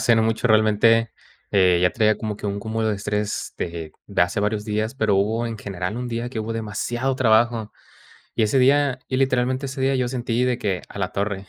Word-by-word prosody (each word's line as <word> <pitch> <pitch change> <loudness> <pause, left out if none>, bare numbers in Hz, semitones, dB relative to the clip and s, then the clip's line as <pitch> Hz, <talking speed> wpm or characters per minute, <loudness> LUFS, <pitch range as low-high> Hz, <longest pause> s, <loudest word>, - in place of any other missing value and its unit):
hace 115 - +4
no 110 - +3
mucho 115 +2 0
realmente, 110 +1 +4 0.4
eh, 90 -3 +4
ya 90 - +4
traía 110 -2 +2
como 110 -2 -4
que - - -13
un 100 0 -2
cúmulo 110 +1 -2
de 105 - 0
estrés 105 +1 -3
de 85 -2 -5 0.2
de - - +2
hace 95 +3 0
varios 105 0 -1
días, 110 +3 -2
pero 110 -5 +2
hubo 110 +4 +1
en 115 -1 -4
general 95 0 -4
un 125 0 -4
día 115 +1 -3
que 115 -3 -4
hubo 110 +1 -4
demasiado 115 +4 -2
trabajo. 115 -2 +2 0.6
Y 115 - +1
ese 110 +5 +2
día 140 0 +3
y 130 - 0
literalmente 130 0 +1
ese 135 0 -5
día, 135 +1 +2
yo 125 -1 0
sentí 120 -1 -1
de 125 -1 +1
que: 95 -6 -2
"A - - -9
la 95 - -1
torre, 100 -1 -3
110 Hz, 220 wpm, -23 LUFS, 105-120 Hz, 0.6 s, hace